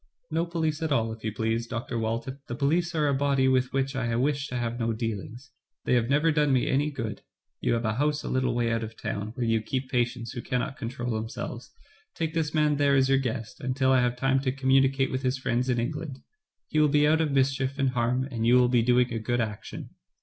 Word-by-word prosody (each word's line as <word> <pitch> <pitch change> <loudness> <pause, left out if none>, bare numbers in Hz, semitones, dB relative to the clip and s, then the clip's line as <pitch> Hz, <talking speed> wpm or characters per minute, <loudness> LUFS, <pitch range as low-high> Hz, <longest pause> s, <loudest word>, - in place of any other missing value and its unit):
*' 250 - -45
"No 165 +2 0
police 160 -3 -1
at 160 -2 -1
all, 115 -4 +1
if 110 - -13
you 110 - -1
please, 115 +2 -1
Dr. 115 0 -3
Walton. 115 +5 -3
The 120 - -4
police 165 +5 +1
are 150 -2 +2
a 140 - +2
body 135 -1 +2
with 130 -1 +2
which 135 0 -1
I 120 -3 -1
wish 140 +3 0
to 125 - -6
have 120 0 -2
no 115 -1 0
dealings. 115 +4 -5 0.3
They - - +2
have 120 -1 +2
never 150 +4 +3
done 150 -2 +2
me 130 -2 +3
any 145 +3 +1
good. 115 -7 -5 0.4
You - - +1
have 115 0 -1
a 110 - +1
house 150 +1 0
a - - -5
little 130 -2 0
way 120 -1 +1
out 115 0 0
of 110 0 -8
town, 100 +1 -3
where 125 - -1
you 115 -1 +2
keep 130 +4 -4
patients 120 -2 -1
who 120 - -5
cannot 125 +2 -2
control 120 +1 -4
themselves. 110 +1 -5 0.5
Take 160 -1 -2
this 160 -3 0
man 150 -2 +2
there 140 -1 +3
as 135 0 +3
your 135 0 +4
guest, 115 -4 -4
until 130 +1 +1
I 130 -1 +5
have 125 0 +1
time 135 +1 +2
to 130 -1 0
communicate 135 0 +2
with 130 - -2
his 130 0 0
friends 125 0 -1
in 125 -1 +2
England. 140 +2 -4 0.4
He 155 - 0
will 150 -1 +5
be 150 +1 +4
out 160 +1 +3
of 155 - +1
mischief 135 0 +1
and 135 -2 +1
harm, 125 +1 0
and 115 -3 -3
you 120 +2 +5
will 125 -1 +5
be 120 -1 +3
doing 125 +1 +3
a 115 - -1
good 120 +2 -1
action." 110 -3 -5
130 Hz, 245 wpm, -27 LUFS, 120-140 Hz, 0.5 s, I